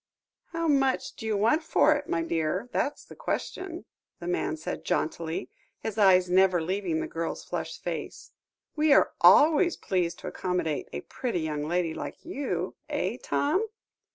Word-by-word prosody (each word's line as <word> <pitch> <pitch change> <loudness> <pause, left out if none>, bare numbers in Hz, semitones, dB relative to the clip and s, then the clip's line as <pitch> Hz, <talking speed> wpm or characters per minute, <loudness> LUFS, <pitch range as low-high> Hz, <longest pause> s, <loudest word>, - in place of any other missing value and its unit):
"How 330 0 -3
much 270 -3 +1
do 225 - -6
you 215 -2 +1
want 230 +11 +3
for 315 -1 +4
it, 290 0 -5
my 165 0 0
dear, 165 +6 -1
that's 290 - -1
the - - -13
question?" 365 -2 -4 0.3
the 170 - -8
man 175 -2 -1
said 155 - -5
jauntily, 160 +1 -2 0.3
his 220 -1 -4
eyes 185 -3 +6
never 185 0 +4
leaving 175 -1 -1
the - - -3
girl's 165 0 -4
flushed - - -5
face; - - -5 0.4
"we 305 -1 +4
are - - +5
always 325 +4 +6
pleased 175 -3 -1
to - - -6
accommodate 180 -5 -2
a 70 - -4
pretty 230 - -3
young 150 -1 -2
lady 170 -1 0
like - - -7
you, 290 -5 -3 0.2
eh, - - -1
Tom?" 405 -4 +1
190 Hz, 160 wpm, -28 LUFS, -, 0.4 s, eyes